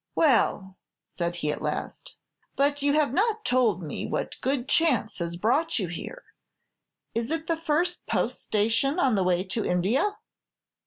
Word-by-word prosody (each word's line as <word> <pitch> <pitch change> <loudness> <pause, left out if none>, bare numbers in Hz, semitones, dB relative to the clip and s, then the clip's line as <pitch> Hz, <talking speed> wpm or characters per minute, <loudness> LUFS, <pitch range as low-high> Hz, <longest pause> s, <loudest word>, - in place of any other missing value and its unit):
"Well," 205 - +2 0.3
said 170 -1 -4
he, 150 -3 -1
at - - -5
last, - - -4 0.4
"but 285 +1 +1
you 285 0 +2
have 295 -4 +2
not 430 +4 +1
told 235 -8 +2
me 150 - -4
what - - -4
good 265 -1 -1
chance 285 -12 +2
has 170 0 -3
brought 275 - +1
you 190 -7 -1
here. - - -7 0.9
Is 230 +1 -2
it 320 0 -2
the 330 - 0
first 330 +2 -1
post - - -1
station 225 - +1
on 270 -8 +3
the 195 -3 +2
way 180 0 +2
to 205 +3 -3
India?" 225 - +1
250 Hz, 160 wpm, -26 LUFS, 190-315 Hz, 0.9 s, on